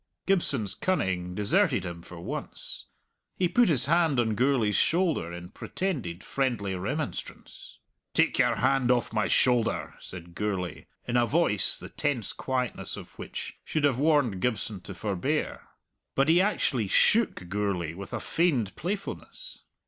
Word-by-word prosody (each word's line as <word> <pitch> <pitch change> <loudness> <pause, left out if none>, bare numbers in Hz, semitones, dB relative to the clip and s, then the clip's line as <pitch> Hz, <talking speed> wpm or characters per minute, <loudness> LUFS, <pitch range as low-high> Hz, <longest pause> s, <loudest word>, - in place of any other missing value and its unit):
Gibson's 140 - +2
cunning 90 - -1
deserted 125 - +2
him 85 -1 -6
for 85 0 -11
once. 85 - -4 0.5
He 180 - +2
put 240 +5 +4
his 135 -6 +3
hand 160 -3 +3
on 110 -2 +2
Gourlay's 120 -3 +2
shoulder 165 - +2
in 85 +1 -8
pretended 115 - -4
friendly 120 -8 -1
remonstrance. 110 - -5 0.4
"Take - - +3
your - - +4
hand 135 -2 +2
off 120 -2 +2
my 110 -1 +1
shouther!" 125 -3 +2
said 85 -1 -10
Gourlay, 95 -3 -3 0.2
in 120 0 +1
a 120 -1 +3
voice 150 - +3
the - - -8
tense 140 -7 -2
quietness 130 -2 -2
of - - -10
which - - -6
should 155 - -2
have 135 -4 +3
warned 145 - +2
Gibson 110 -5 -1
to - - -9
forbear. 110 - -2 0.5
But 135 +3 +3
he 170 +3 +6
actually 135 - +1
shook 210 - +3
Gourlay 95 -4 -1
with 100 +3 -8
a - - -2
feigned 140 - +1
playfulness. 200 - -6
120 Hz, 145 wpm, -28 LUFS, 100-155 Hz, 0.5 s, he